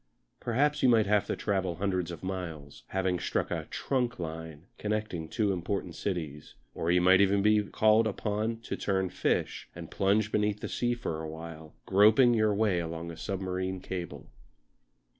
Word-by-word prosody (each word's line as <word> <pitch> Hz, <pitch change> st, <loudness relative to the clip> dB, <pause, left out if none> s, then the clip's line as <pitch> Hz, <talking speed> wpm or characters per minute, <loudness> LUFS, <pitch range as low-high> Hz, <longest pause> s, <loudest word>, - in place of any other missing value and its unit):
Perhaps 145 Hz, +5 st, +1 dB
you 130 Hz, -, +5 dB
might 115 Hz, -3 st, +5 dB
have 105 Hz, 0 st, +2 dB
to -, -, -1 dB
travel 95 Hz, -4 st, -1 dB
hundreds 90 Hz, -1 st, -1 dB
of 85 Hz, -, -8 dB
miles, 85 Hz, -7 st, -6 dB
having 95 Hz, -2 st, 0 dB
struck -, -, -1 dB
a -, -, -2 dB
"trunk" 125 Hz, -3 st, -1 dB
line 80 Hz, -1 st, -7 dB
connecting 105 Hz, -6 st, -2 dB
two 105 Hz, +4 st, 0 dB
important 95 Hz, +2 st, -3 dB
cities; 80 Hz, -7 st, -4 dB, 0.2 s
or 80 Hz, -, -2 dB
you 90 Hz, +1 st, +5 dB
might 90 Hz, +2 st, +6 dB
even 100 Hz, 0 st, +3 dB
be 105 Hz, 0 st, +4 dB
called 110 Hz, +2 st, +3 dB
upon 110 Hz, +2 st, -2 dB
to -, -, -4 dB
turn 95 Hz, -2 st, 0 dB
fish -, -, -1 dB
and -, -, -9 dB
plunge 105 Hz, +2 st, +2 dB
beneath 105 Hz, 0 st, +1 dB
the -, -, -4 dB
sea 120 Hz, 0 st, 0 dB
for 80 Hz, -9 st, -4 dB
a 80 Hz, -, -5 dB
while, 80 Hz, -1 st, -9 dB
groping 110 Hz, +5 st, +6 dB
your 110 Hz, -2 st, +3 dB
way 100 Hz, -3 st, +2 dB
along 85 Hz, 0 st, -5 dB
a -, -, -8 dB
submarine 95 Hz, 0 st, -3 dB
cable. 90 Hz, -2 st, -6 dB
95 Hz, 170 wpm, -29 LUFS, 85-105 Hz, 0.2 s, might